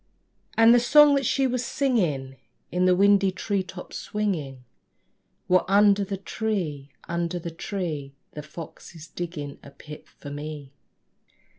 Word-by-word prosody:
And 225 +1 +7
the 245 - +6
song 295 +4 +6
that 275 -3 +1
she 270 - +2
was 250 -1 0
singing, 170 - -1 0.3
In 180 +1 +1
the 180 0 +5
windy 200 0 +4
tree 195 +2 -1
tops 185 0 -8
swinging, 160 -12 -3 0.8
Was 185 0 +4
under 200 +1 +5
the 195 0 -4
tree, 185 -9 -3 0.2
under 170 +1 -2
the 170 -1 -6
tree 165 -6 -5 0.2
The 150 - -7
fox 155 +3 -11
is 160 -1 -10
digging 165 -5 -6
a - - -12
pit 150 +2 -12
for 145 - -11
me. 145 -1 -7
180 Hz, 145 wpm, -25 LUFS, 150-205 Hz, 0.8 s, And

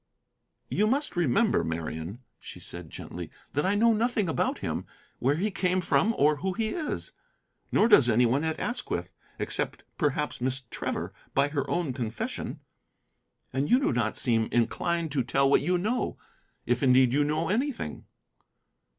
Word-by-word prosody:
"You 210 - +1
must 275 +3 0
remember, 175 - +2
Marian," 80 +6 -4 0.2
she - - -10
said - - -6
gently, - - -7 0.2
"that 145 +5 +1
I 200 - +2
know 230 +2 +5
nothing 225 -2 +1
about 160 - 0
him, - - -3 0.3
where 135 +4 +2
he 200 +6 0
came 185 -1 +1
from, 215 +5 +2
or 150 +1 +4
who 190 +5 -2
he 220 +2 -1
is. 310 +1 -3 0.6
Nor - - +4
does 140 - +7
any 120 +2 +4
one 130 +6 +2
at 160 -1 -1
Asquith, 245 +1 -3 0.3
except - - -1 0.2
perhaps 150 -4 0
Miss 130 +1 -1
Trevor, - - -3 0.2
by 140 +1 +3
her 145 -2 -2
own 170 -7 0
confession. 120 -3 -4 0.9
And 135 +4 0
you 250 - +6
do 275 - +1
not 115 -3 0
seem 115 -2 +1
inclined 165 +7 0
to 135 -2 +1
tell 135 +3 +2
what 140 - +4
you 180 0 +2
know, 220 +8 -1 0.5
if - - +1
indeed 130 -2 +5
you 145 +1 +3
know 155 +3 0
anything." 250 +5 -2
150 Hz, 160 wpm, -28 LUFS, 130-205 Hz, 0.9 s, does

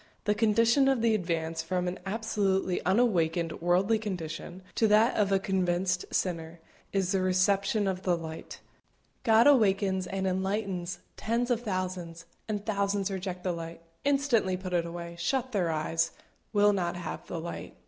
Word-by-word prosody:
The 210 - +2
condition 230 +5 +3
of 265 -4 +2
the 230 -1 +4
advance 165 -4 -1
from 180 +2 -1
an 180 - -3
absolutely 195 -3 0
unawakened 175 -7 +1
worldly 185 +6 +2
condition, 180 -3 -5
to 225 - +3
that 215 +4 +4
of 200 -2 +2
a 195 - +5
convinced 185 -1 0
sinner, 170 -2 -2 0.3
is 190 -2 0
the 195 -2 +1
reception 195 +3 +2
of 185 -1 -2
the 180 -2 +1
light. 160 -1 -8 0.6
God 225 -2 +5
awakens 195 -8 +3
and 190 0 -2
enlightens 190 -1 -1 0.2
tens 235 +3 0
of 235 -1 +1
thousands, 185 -5 -4 0.2
and 210 -1 -3
thousands 200 -1 0
reject 185 -1 -4
the 185 - 0
light 165 0 -7 0.2
instantly 270 -10 +2
put 185 -1 -6
it 170 -1 +1
away 170 0 -7
shut 255 +8 -1
their 185 -7 +1
eyes 165 +1 0 0.4
will 205 -1 +4
not 175 -3 -1
have 175 -2 -6
the 170 - -4
light. 170 +1 -7
190 Hz, 160 wpm, -29 LUFS, 175-210 Hz, 0.6 s, a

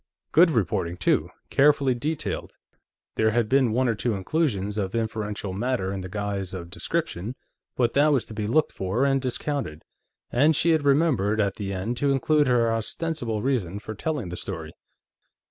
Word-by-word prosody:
Good 170 +3 +6
reporting, 90 - 0
too; 90 - +1 0.2
carefully 140 -2 +4
detailed. 150 +6 -3 0.6
There 110 - +4
had 115 0 +1
been 130 -1 +3
one 125 +3 +2
or 115 - +2
two 105 +1 -1
inclusions 105 - -1
of 95 +2 -2
inferential 105 -3 -3
matter 105 -2 -1
in 95 - -4
the 95 - -7
guise 100 -2 -3
of 85 -1 -7
description, 100 +9 -3 0.4
but 120 -2 +1
that 145 +2 +4
was 130 -7 +2
to - - -10
be 105 -1 -3
looked 155 +7 +2
for 100 +8 0
and 135 -1 +2
discounted. 125 - -3 0.5
And 150 +6 +4
she 170 - +3
had 155 -3 +2
remembered, 135 - +3
at 100 -2 +1
the 100 -2 -4
end, 100 +6 -3
to 140 +2 +2
include 145 +2 +3
her 120 -2 +3
ostensible 115 -1 -3
reason 110 -9 0
for 110 +1 -6
telling 130 - -3
the 90 - -5
story. 80 -5 -6
115 Hz, 175 wpm, -25 LUFS, 100-140 Hz, 0.6 s, Good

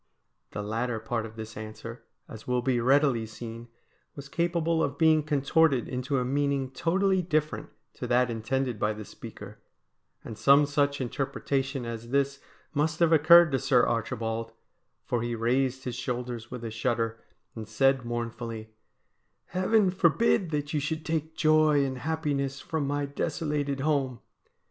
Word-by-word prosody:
The 105 - -5
latter 115 +2 -2
part 115 0 -3
of 110 - -14
this 110 0 -8
answer, 110 +2 -8 0.3
as 110 0 -11
will 125 -1 0
be 125 -2 +1
readily 130 -2 +3
seen, 115 +1 -8 0.5
was 140 -1 -9
capable 170 0 0
of 140 -2 -1
being 160 0 +5
contorted 145 -2 +2
into 130 +2 -2
a 125 - 0
meaning 140 0 0
totally 190 +7 +1
different 155 -3 -1 0.2
to 125 - -6
that 125 0 +2
intended 120 +1 -2
by 105 0 +1
the 105 0 -8
speaker, - - -11 0.7
and 110 - -8
some 140 +1 +6
such 145 0 0
interpretation 135 +1 -2
as 115 0 -6
this 140 +1 0 0.3
must 155 +1 0
have 170 -1 +4
occurred 160 +1 +7
to 135 - +1
Sir 135 -2 +3
Archibald, 115 0 -2 0.5
for 120 - -1
he 120 0 -2
raised 130 +3 0
his 125 -1 -4
shoulders 120 -2 -4
with 125 -2 -7
a 115 - -4
shudder, 115 0 -1 0.3
and 110 -2 -7
said 135 +4 +2
mournfully: 115 -2 -5 0.4
' - - -48
Heaven 185 +2 +2
forbid 185 +1 +2
that 145 -1 -3
you 150 - +1
should 155 +2 -3
take 160 0 -2
joy 155 -2 +4
and 130 -1 -4
happiness 140 -3 -2
from 155 -3 -3
my 145 0 -1
desolated 145 -1 -2
home 135 -5 0
135 Hz, 155 wpm, -28 LUFS, 115-150 Hz, 0.7 s, occurred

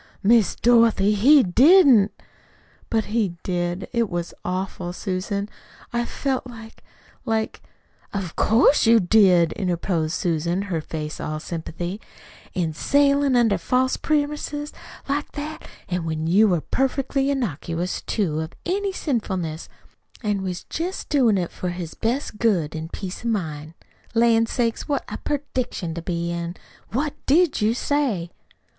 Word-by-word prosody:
"Miss 225 0 +4
Dorothy, 230 -4 +4
he 265 +7 +6
didn't!" 255 - +6 0.8
"But 220 -1 +1
he 205 -7 +1
did. 175 0 -2
It 235 -3 +1
was 175 -1 -4
awful, 180 -1 -3
Susan. 195 +2 -3 0.5
I 240 0 0
felt 265 +1 -2
like 225 -2 -12 0.4
like 220 -1 -2 0.3
" - - -35
"Of 195 -5 -4
course 235 +3 +4
you 230 0 +7
did," 180 -4 +4
interposed 175 -3 -1
Susan, 170 +2 0
her 180 -5 -2
face 155 0 -6
all 155 0 -3
sympathy, 175 +4 -5 0.5
"a 170 -4 0
sailin' 280 - +2
under 225 -6 +3
false 255 +8 +1
premises 295 0 -2 0.3
like 285 +1 -2
that, 300 +2 -6 0.2
an' 180 -1 -2
when 160 -1 -2
you 200 +7 +5
were 175 -5 +1
perfectly 270 - 0
innocuous, 180 - -2
too, 170 -8 -1
of 160 +1 -5
any 390 +3 0
sinfulness, 190 - -3 0.5
an' 205 -2 0
was 180 -2 -4
jest 355 +4 -4
doing 245 -8 +3
it 175 -2 -2
for 180 - -4
his 175 -2 -5
best 235 -1 -2
good 175 -10 +1
an' 160 +1 -5
peace 185 +3 -6
of 235 - -1
mind. 160 -7 -3 0.4
Lan' 230 0 +4
sakes, 230 -1 -1
what 285 - 0
a - - -5
prediction 255 - -3
to 170 - -5
be 170 0 -2
in! 170 0 -4 0.3
What 280 +6 -1
DID 315 -1 +3
you 220 +2 +2
say?" 245 -12 -1
205 Hz, 140 wpm, -23 LUFS, 175-255 Hz, 0.8 s, you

